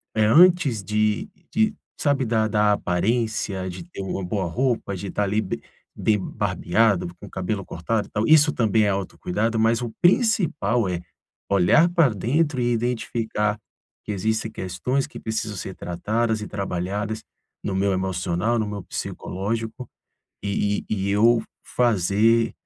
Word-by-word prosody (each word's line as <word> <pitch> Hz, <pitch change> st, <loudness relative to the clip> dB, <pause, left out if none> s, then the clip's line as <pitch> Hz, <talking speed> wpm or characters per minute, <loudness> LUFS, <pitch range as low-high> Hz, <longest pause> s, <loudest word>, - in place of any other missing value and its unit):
é 110 Hz, -1 st, +3 dB
antes 155 Hz, -, +5 dB
de 105 Hz, -, 0 dB, 0.2 s
de, 220 Hz, 0 st, +2 dB, 0.2 s
sabe, 145 Hz, -3 st, +1 dB
da 110 Hz, -1 st, +1 dB
da 105 Hz, -1 st, +3 dB
aparência, 100 Hz, 0 st, -1 dB
de 90 Hz, -, -7 dB
ter 135 Hz, -, -7 dB
uma 95 Hz, 0 st, -3 dB
boa 95 Hz, +2 st, -1 dB
roupa, 115 Hz, +2 st, -1 dB
de 100 Hz, +2 st, -6 dB
estar 105 Hz, -, -1 dB
ali 105 Hz, +2 st, +1 dB
be 95 Hz, -, -4 dB, 0.4 s
bem 110 Hz, -1 st, +3 dB
barbeado, 95 Hz, +1 st, +1 dB
com -, -, -12 dB
o -, -, -11 dB
cabelo 95 Hz, +1 st, -3 dB
cortado, 105 Hz, +6 st, -2 dB
e -, -, -24 dB
tal. 105 Hz, +1 st, 0 dB
Isso 155 Hz, -1 st, +6 dB
também 110 Hz, -2 st, +2 dB
é -, -, +2 dB
autocuidado, 100 Hz, +3 st, -1 dB
mas 115 Hz, +2 st, +3 dB
o 120 Hz, -2 st, -4 dB
principal 170 Hz, -, +2 dB
é; 90 Hz, -1 st, -2 dB, 0.5 s
olhar 100 Hz, -, +5 dB
pra 170 Hz, -5 st, +4 dB
dentro 130 Hz, -, 0 dB
e 120 Hz, 0 st, +1 dB
identificar 115 Hz, -3 st, -1 dB, 0.5 s
que -, -, -3 dB
existem 110 Hz, +3 st, -1 dB
questões 125 Hz, +8 st, -2 dB
que 150 Hz, -, -10 dB
precisam 110 Hz, -2 st, -3 dB
ser 95 Hz, +1 st, -6 dB
tratadas 110 Hz, +5 st, -1 dB
e 105 Hz, -, -5 dB
trabalhadas 100 Hz, +2 st, -3 dB, 0.4 s
no 95 Hz, -, -2 dB
meu 100 Hz, +1 st, +2 dB
emocional, 95 Hz, +3 st, 0 dB
no 110 Hz, -, -1 dB
meu 100 Hz, -2 st, -5 dB
psicológico 110 Hz, +6 st, -4 dB, 0.5 s
e 100 Hz, 0 st, -1 dB
e -, -, 0 dB
e -, -, +1 dB
eu 115 Hz, +4 st, +5 dB
f 110 Hz, -, -12 dB, 0.3 s
fazer 115 Hz, 0 st, +3 dB
110 Hz, 155 wpm, -24 LUFS, 100-120 Hz, 0.5 s, Isso